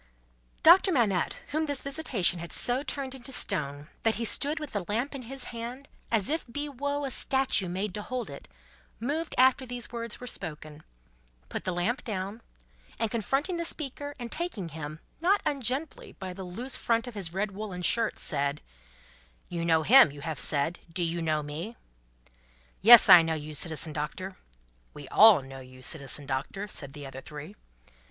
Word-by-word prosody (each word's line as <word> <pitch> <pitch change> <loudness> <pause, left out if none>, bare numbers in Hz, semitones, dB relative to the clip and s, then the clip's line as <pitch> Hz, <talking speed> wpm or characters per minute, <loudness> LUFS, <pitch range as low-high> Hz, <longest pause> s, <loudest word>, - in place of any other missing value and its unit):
Doctor 370 +4 +7
Manette, 215 - +1
whom 310 +2 -1
this 285 -3 -1
visitation 270 - +1
had 170 0 -8
so 245 +2 +1
turned 275 -1 -3
into 265 0 -10
stone, 150 - -1
that 225 -1 +2
he 230 - -2
stood 290 +7 0
with 300 -2 -7
the 205 -3 -2
lamp 240 +8 -1
in 275 - -6
his 265 +2 -5
hand, 240 +4 -7 0.2
as 225 -3 +1
if 315 +4 +1
he 290 +4 -2
were 285 +1 -3
a 270 - -4
statue 265 -9 +1
made 190 +2 -3
to 210 - -4
hold 245 0 -4
it, 140 - -10 0.5
moved 300 +8 -2
after 260 +1 +5
these 245 -1 -5
words 230 -2 -5
were 250 - -8
spoken, 155 -8 -7 0.7
put - - -5
the 185 - 0
lamp 180 +9 -1
down, 205 +1 -4 0.6
and 225 -1 0
confronting 270 - -1
the 340 - -2
speaker, 290 -3 -4
and 240 -3 -7
taking 310 - -3
him, 155 0 -7 0.2
not 380 +5 +3
ungently, 275 +2 -2
by 185 -1 -6
the 190 +1 -8
loose 230 +9 -3
front 230 -1 0
of 245 - -7
his 195 -6 -3
red 200 +3 -2
woollen 195 -3 -6
shirt, 230 +4 +1
said: 145 -1 -2 0.9
"You 170 -1 -3
know 160 -1 +3
him, 255 - +8
you 145 0 -11
have 155 -1 -4
said. 155 +4 +3
Do 175 +1 -1
you 170 0 -1
know 155 -2 0
me?" 165 +11 -6 1.0
"Yes, 235 +4 +10
I 180 -3 +10
know 165 0 -1
you, 155 0 -6
Citizen 160 0 -1
Doctor." 185 +6 -5 0.6
"We 145 -2 -9
all 210 -9 +7
know 135 0 -10
you, 130 0 -14
Citizen 145 -1 -2
Doctor," 145 +10 -3
said 140 -9 -2
the 145 -2 -9
other 135 0 -8
three. 150 +7 -9
210 Hz, 180 wpm, -28 LUFS, 160-260 Hz, 1.0 s, Yes